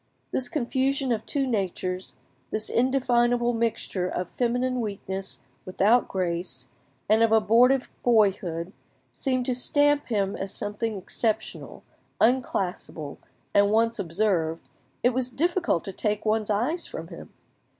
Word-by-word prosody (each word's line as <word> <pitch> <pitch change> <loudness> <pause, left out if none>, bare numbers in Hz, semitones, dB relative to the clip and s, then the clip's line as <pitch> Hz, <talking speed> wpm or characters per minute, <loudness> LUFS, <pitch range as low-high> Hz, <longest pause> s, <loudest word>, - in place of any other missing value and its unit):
This 250 -2 -1
confusion 270 0 0
of 220 -2 -2
two 275 -2 0
natures, 185 - -2 0.3
this 215 0 -2
indefinable 245 -1 +2
mixture 225 -5 -1
of 180 0 -4
feminine 250 +1 0
weakness 195 -2 -5 0.2
without 205 +6 +3
grace, 170 -7 -3 0.4
and 220 +2 +4
of 230 -1 +4
abortive 235 +5 +4
boyhood, 190 -6 +2 0.4
seemed 255 -2 -1
to 255 - +1
stamp 290 +3 +2
him 200 -4 0
as 195 0 -4
something 210 +1 -3
exceptional, 220 +3 -3 0.4
unclassable, 190 - 0 0.3
and 200 0 +5
once 230 +2 +2
observed, 170 -3 0 0.4
it 245 - +5
was 255 0 0
difficult 340 - 0
to 195 - -5
take 210 +2 -1
one's 215 0 +1
eyes 250 - 0
from - - -7
him. - - -10
220 Hz, 125 wpm, -26 LUFS, 195-250 Hz, 0.4 s, and